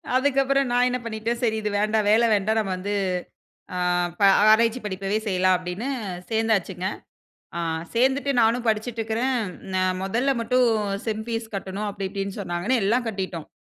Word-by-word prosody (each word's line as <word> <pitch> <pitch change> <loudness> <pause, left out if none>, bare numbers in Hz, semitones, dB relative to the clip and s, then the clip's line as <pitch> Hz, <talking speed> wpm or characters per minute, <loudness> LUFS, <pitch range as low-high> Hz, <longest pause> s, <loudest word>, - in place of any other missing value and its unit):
அதுக்கப்பறம் 275 0 +2
நான் 245 0 +4
என்ன 250 - -1
பண்ணிட்டேன், 230 +1 -3
"சரி, 220 -2 +2
இது 210 - -1
வேண்டாம். 215 0 +1
வேலை 225 +2 +5
வேண்டாம். 215 +3 +1
நம்ம 195 -3 -1
வந்து 200 +3 -3 0.8
ஆ - - -2 0.4
ப - - -9 0.3
ஆராய்ச்சி 230 +2 +4
படிப்பவே 195 +1 -2
செய்யலாம்." 185 -1 +3
அப்படீன்னு 180 +8 -5 0.4
சேர்ந்தாச்சுங்க. 210 -5 0 0.7
அ - - -2 0.3
சேர்ந்துட்டு 265 +4 +2
நானும் 230 +2 +2
படிச்சுட்டுருக்கிறேன், 225 +3 0 0.4
"நான் 185 0 +1
மொதல்ல 240 +8 +1
மட்டும் 250 +1 +3 0.4
செம் 220 -1 -2
ஃபீஸ் 225 -1 -4
கட்டணும்." 195 +2 -4
அப்படி 200 -1 -4
இப்படீன்னு 195 0 -4
சொன்னாங்கன்னு, 195 +6 0
எல்லாம் 235 +5 +1
கட்டிட்டோம். 190 -6 -4
220 Hz, 145 wpm, -24 LUFS, 195-240 Hz, 0.8 s, வேலை